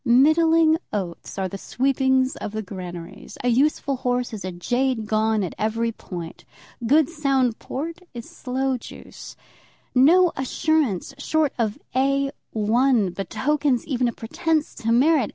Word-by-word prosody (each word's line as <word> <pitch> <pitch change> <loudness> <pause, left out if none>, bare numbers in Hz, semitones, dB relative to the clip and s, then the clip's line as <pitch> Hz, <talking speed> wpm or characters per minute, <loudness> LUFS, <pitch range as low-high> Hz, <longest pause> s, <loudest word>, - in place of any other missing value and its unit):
Middling 315 +5 +4
oats 185 -4 -5
are 190 -1 -1
the 195 +2 -7
sweepings 265 +1 +1
of 205 - -6
the 220 0 -3
granaries. 180 -3 -8
A 245 - +2
useful 275 +2 +1
horse 245 -1 -1
is 210 - -6
a 185 - -4
jade 245 +6 -1
gone 215 0 +1
at 180 - -4
every 225 +2 0
point. 175 -6 -8 0.4
Good 295 +3 +5
sound 275 -7 0
port 320 +5 -5
is 235 -2 -8
sloe 265 0 -2
juice. - - -11 0.6
No 330 +8 +5
assurance 265 - 0
short 310 +1 +1
of 220 -2 0 0.2
A 275 +1 +2 0.2
1 225 -1 +2
betokens 260 +8 0
even 255 -4 0
a - - 0
pretence 315 +7 -1
to 230 -2 -2
merit. 265 +1 +4
255 Hz, 140 wpm, -23 LUFS, 220-280 Hz, 0.6 s, Good